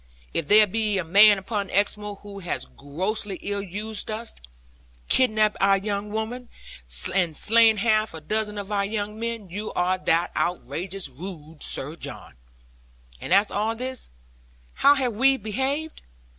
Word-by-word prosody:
If 165 - -1
there 215 +3 +8
be 210 0 0
a 185 - 0
man 200 +5 +7
upon 200 0 -3
Exmoor 205 +1 0
who 200 0 -11
has 180 -3 -3
grossly 190 +8 -3
ill 200 0 -2
used 205 +3 -4
us, 225 +2 -4 0.8
kidnapped 215 -4 +3
our 195 0 +5
young 200 +1 -3
women, 225 +3 -4 0.6
and 175 -5 +1
slain 225 0 +5
half 215 -3 +1
a - - -6
dozen 210 +6 -1
of 200 0 -6
our 200 -1 +1
young 210 +1 -4
men, 230 -5 -4
you 210 +3 -5
are 185 +1 0
that 170 -1 +1
outrageous 180 +2 -2
rogue, 155 +2 -9
Sir 150 +4 0
John. - - -9 0.9
And - - -6
after 200 +3 +4
all 215 +3 0
this, 255 +1 -6 0.6
how 285 +1 +5
have 255 -4 0
we 265 +5 +3
behaved? 270 +8 -3
205 Hz, 150 wpm, -24 LUFS, 190-220 Hz, 0.9 s, there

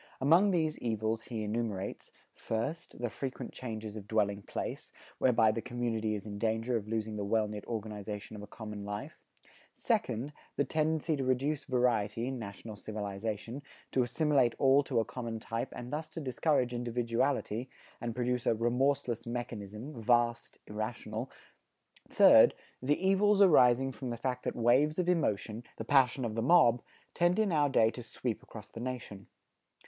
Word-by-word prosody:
Among 165 +9 +5
these 160 -4 0
evils 110 -1 -1
he 115 -3 -4
enumerates: 105 -3 -3 0.2
first, 115 +9 -4
the 120 -1 -1
frequent 135 -2 -5
changes 110 -4 -6
of 105 -2 -8
dwelling 105 -2 +1
place, - - -5 0.3
whereby 115 -4 +4
the 115 +1 -3
community 115 -2 -2
is 105 - -6
in 100 -1 -6
danger 115 +3 0
of 105 -2 -2
losing 110 -1 -2
the 105 - -2
well 110 +1 +1
knit 105 -1 -6
organization 105 -2 -5
of 105 - -8
a 105 - -9
common 105 -2 -7
life; 105 0 -6 0.6
second, 125 +7 -1 0.2
the - - +2
tendency 160 +1 0
to 135 - -1
reduce 135 +4 0
variety 120 -4 +1
in 130 -1 -3
national 105 0 -8
civilization, 105 +4 -4 0.3
to 130 - +2
assimilate 130 -1 +2
all 135 +1 +5
to 125 -4 +1
a 115 - +1
common 115 -1 -5
type 115 +1 -3
and 125 +2 -7
thus 155 +1 -3
to - - -7
discourage 130 -2 +1
individuality, 120 0 -1 0.3
and 115 -1 -3
produce 125 0 -1
a - - +4
"remorseless 125 +1 0
mechanism 120 +1 -5
vast, 120 0 +1
irrational;" 110 +2 -4 0.8
third, - - +7 0.3
the 145 +4 +2
evils 200 +1 +4
arising 135 -8 +6
from 125 +1 -6
the 120 - -3
fact 125 0 -2
that - - -2
waves 130 +6 +3
of 180 -1 0
emotion, 115 - 0
the 110 - -5
passion 130 -1 +3
of 110 - -3
the 115 - -1
mob, 125 -4 +5 0.3
tend 175 +1 +2
in 215 -3 +2
our 145 -3 +3
day 115 -4 +4
to 125 - -8
sweep 115 0 -4
across 110 - -11
the - - -10
nation. 120 -5 -6
120 Hz, 165 wpm, -32 LUFS, 110-135 Hz, 0.8 s, third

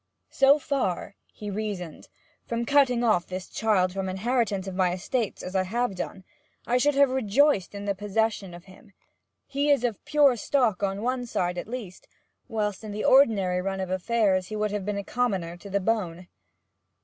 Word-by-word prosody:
'So 275 +2 +5
far,' 265 - -2 0.2
he 210 -1 -7
reasoned, 195 -5 -5 0.4
'from 235 0 -2
cutting 260 -3 +3
off 215 -7 +2
this 185 0 -6
child 190 -5 +1
from 190 -1 -3
inheritance 205 0 0
of 190 - -5
my 180 -1 +1
estates, 210 +4 -2
as 185 +1 -6
I 190 - +3
have 235 +4 -1
done, 190 +1 -6 0.4
I 245 +1 +2
should 290 +2 +2
have 280 -1 +4
rejoiced 260 -3 +2
in 200 0 -6
the 200 - 0
possession 205 -1 -1
of 175 - -12
him! 195 +2 -17 0.5
He 285 +1 -1
is 280 -4 +4
of 235 -5 -2
pure 295 -3 +4
stock 230 -4 +1
on 200 +1 -1
one 250 0 -1
side 180 -5 -1
at - - -7
least, 225 -6 -7 0.4
whilst 210 -2 -2
in 215 - -6
the 210 - -3
ordinary 200 -9 +4
run 195 +1 -3
of 185 -1 -3
affairs 190 -1 +1
he 215 - -6
would 210 -1 -1
have 205 -2 -3
been 205 -1 -1
a 200 - -3
commoner 195 -8 -1
to 200 +3 -11
the 200 +1 +1
bone.' 185 -4 -2
210 Hz, 185 wpm, -26 LUFS, 185-245 Hz, 0.5 s, So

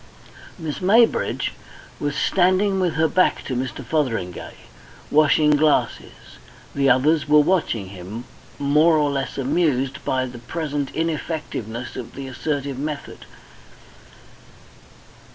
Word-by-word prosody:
Miss 160 -4 -5
Maybridge 225 +5 +3 0.5
was 145 -1 -2
standing 190 +3 +2
with 175 -4 0
her 160 +1 +3
back 185 +3 +2
to 130 - -4
Mr. 125 0 -4
Fotheringay, 115 - -2 0.6
washing 150 0 +4
glasses; 150 0 0 0.3
the 140 -1 +2
others 145 +5 +3
were 150 - +6
watching 145 - +1
him, 100 +5 -8 0.3
more 150 +3 +4
or 145 -1 +2
less 135 -1 -3
amused 135 -1 0
by 130 0 0
the 125 -1 -9
present 145 +1 -3
ineffectiveness 150 -8 -4
of 120 -1 -8
the 135 - -6
assertive 140 0 -3
method. 150 0 -6
145 Hz, 115 wpm, -22 LUFS, 130-160 Hz, 0.6 s, were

